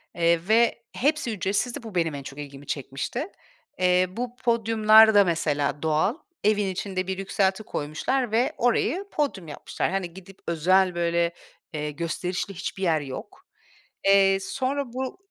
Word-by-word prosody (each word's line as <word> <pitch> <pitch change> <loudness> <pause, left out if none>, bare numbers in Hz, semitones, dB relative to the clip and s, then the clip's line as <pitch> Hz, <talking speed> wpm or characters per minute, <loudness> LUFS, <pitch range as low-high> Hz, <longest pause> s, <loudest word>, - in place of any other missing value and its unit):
Eee, 170 0 +3
ve 235 +2 +3
hepsi 285 -2 +1
ücretsizdi. 205 +4 -1
Bu 220 -4 -9
benim 165 -4 +1
en 140 - -6
çok 135 +2 -9
ilgimi 140 -1 -9
çekmişti. 140 - -4 0.5
Eee, 180 0 +4
bu 240 +5 -5
podyumlar 220 -2 +5
da 205 -1 +7
mesela 150 -5 0
doğal. 160 - +2 0.3
Evin 210 -1 +2
içinde 190 0 -3
bir 190 0 -2
yükselti 195 +1 0
koymuşlar 215 - -2
ve 230 +3 +2
orayı 245 - +1
podyum 265 - -2
yapmışlar. 150 - -3
Hani 185 -3 -3
gidip 190 +1 -13
özel, 180 +3 +3
böyle, 170 0 +1 0.4
eee, 150 -1 -3
gösterişli 175 +5 -3
hiçbir 190 +2 -5
yer 160 -4 +2
yok. 135 -2 -9 0.6
Eee, 195 -1 +5
sonra 270 +7 -2
bu 260 0 -4
190 Hz, 145 wpm, -25 LUFS, 170-225 Hz, 0.6 s, da